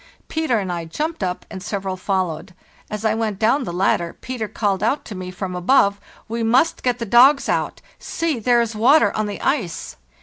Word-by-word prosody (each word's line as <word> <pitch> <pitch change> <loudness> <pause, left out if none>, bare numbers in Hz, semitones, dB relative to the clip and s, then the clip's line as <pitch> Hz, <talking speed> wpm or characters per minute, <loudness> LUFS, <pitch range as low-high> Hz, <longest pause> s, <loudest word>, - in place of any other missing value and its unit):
Peter 315 -7 0
and 190 -3 -2
I 170 -1 -4
jumped 310 - -4
up 180 -1 -3
and 190 - -7
several 195 -1 -3
followed. 185 -2 -2 0.3
As 210 +1 -5
I 220 - +3
went 220 -3 -2
down 240 +6 +2
the - - -4
ladder 175 -1 0
Peter 250 -4 -4
called 200 -3 -1
out 250 +7 0
to 220 - -7
me 185 -1 -6
from 185 0 -5
above: 200 +1 +3 0.3
'We 230 +1 -3
must 245 +9 +2
get 250 -1 0
the 235 - -4
dogs 255 +6 +5
out; - - -1 0.2
see, 325 -6 -2
there 240 +1 +3
is 230 -1 -2
water 260 +9 +4
on 215 -1 -1
the 205 - -5
ice! 200 - -2
215 Hz, 200 wpm, -21 LUFS, 190-245 Hz, 0.3 s, dogs